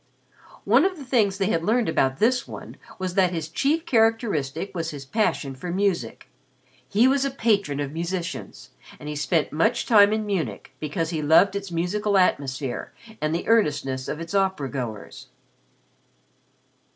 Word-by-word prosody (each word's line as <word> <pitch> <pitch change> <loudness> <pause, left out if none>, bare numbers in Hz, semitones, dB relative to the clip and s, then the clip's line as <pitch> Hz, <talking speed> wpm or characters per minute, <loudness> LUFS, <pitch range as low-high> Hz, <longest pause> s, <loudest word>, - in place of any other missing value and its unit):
One 235 +8 +5
of 375 -1 0
the 280 - -9
things 215 -7 +2
they 195 0 0
had 165 - 0
learned 225 +4 +2
about 135 -4 +1
this 245 +2 +2
one - - -9 0.2
was 185 -1 -3
that 185 -1 +3
his 165 -3 -3
chief 285 - 0
characteristic 220 - +1
was 165 -3 -3
his 145 -3 -8
passion 160 -4 -1
for 135 +7 -7
music. 190 0 -1 0.6
He 225 +5 +4
was 270 +1 +2
a 275 - 0
patron 205 - 0
of 140 -1 -3
musicians 170 +2 -5 0.3
and 150 - -9
he 150 - -4
spent 150 +2 0
much 220 +10 +1
time 205 -3 +6
in 215 0 -1
Munich 160 - -3
because 155 +2 -2
he 160 -2 -2
loved 160 +7 +4
its 200 -1 -4
musical 195 +5 0
atmosphere 135 -7 0 0.3
and 155 +1 0
the 170 - -4
earnestness 145 - +1
of 150 - -4
its 165 +3 -7
opera 190 -8 0
goers. 120 -6 -6
180 Hz, 165 wpm, -24 LUFS, 150-215 Hz, 0.6 s, time